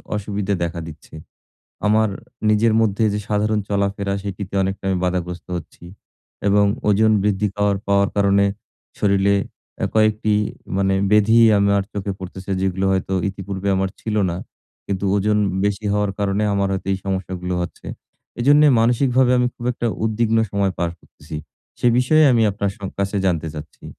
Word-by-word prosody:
অসুবিধা 100 -1 -2
দেখা 85 0 -3
দিচ্ছে। 75 -1 -13 0.7
আমার 110 +1 +3 0.4
নিজের 110 +1 +3
মধ্যে 110 0 +1
যে 105 - -1
সাধারণ 105 +1 +1
চলাফেরা, 100 0 -1
সেটিতে 100 -1 -6
অনেকটা 95 +1 -3
আমি 95 - +1
বাধাগ্রস্ত 90 -2 -3
হচ্ছি। 85 +1 -10 0.6
এবং 100 +1 +4 0.2
ওজন 110 +2 +4
বৃদ্ধি 105 0 +1
পাওয়ার 105 -1 +1
পাওয়ার 100 0 +3
কারণে 100 0 +3 0.5
শরীরে 100 0 +2 0.5
আ - - +2
কয়েকটি 110 -1 +2 0.4
মানে 95 0 +2 0.2
ব্যাধি 105 +2 +5 0.2
আমার 100 0 +3
চোখে 100 -1 -3
পড়তেছে, 95 +1 -8
যেগুলো 95 0 0
হয়তো 95 0 -1
ইতিপূর্বে 95 0 -5
আমার 95 0 0
ছিল 110 -1 -3
না। 85 - -3 0.5
কিন্তু 100 0 -3
ওজন 105 +1 +1 0.3
বেশি 105 +1 -1
হওয়ার 105 -1 +1
কারণে 100 0 0
আমার 100 0 +1
হয়তো 95 - -4
এই 95 - -1
সমস্যাগুলো 95 -1 -3
হচ্ছে। 85 - -8 0.5
এজন্যে 145 +4 +5
মানসিকভাবে 125 +2 +3
আমি 125 - +2
খুব 120 - -10
একটা 120 -1 -3 0.2
উদ্বিগ্ন 110 +1 +1
সময় 100 -1 0
পার 85 -1 0
করতেছি। 75 +2 -11 0.4
সে - - 0
বিষয়ে 155 +5 +4
আমি 115 -2 +3
আপনার 100 0 -2
স - - -22 0.2
কাছে 100 +1 -1
জানতে 80 -3 0
চাচ্ছি। 75 0 -10
100 Hz, 155 wpm, -21 LUFS, 95-105 Hz, 0.7 s, ব্যাধি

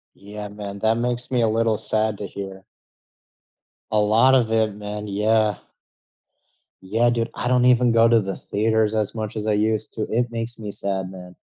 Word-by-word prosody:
Yeah, 105 +1 -8
man. 100 -1 -7
That 110 +2 +2
makes 120 0 -2
me 125 -2 +2
a 115 - +3
little 110 0 +1
sad 110 -1 -1
to 100 - -4
hear. 95 -1 -8 1.3
A 110 - +3
lot 115 +5 +4
of 120 -4 +2
it, 110 -2 +1
man, 105 0 -6
yeah. 105 +1 +2 1.3
Yeah, 110 +6 +1
dude. 115 -1 -1
I - - -4
don't 125 0 +3
even 125 -1 +4
go 115 0 +5
to 115 -1 +4
the 95 -1 -4
theaters 110 +1 0
as 110 -1 -1
much 110 -1 -4
as 110 0 -3
I 105 - +2
used 110 +1 0
to, 110 - -2
it 120 +1 0
makes 115 0 -5
me 105 -2 -5
sad, 95 -2 -3
man. 90 -1 -11
110 Hz, 190 wpm, -22 LUFS, 105-115 Hz, 1.3 s, go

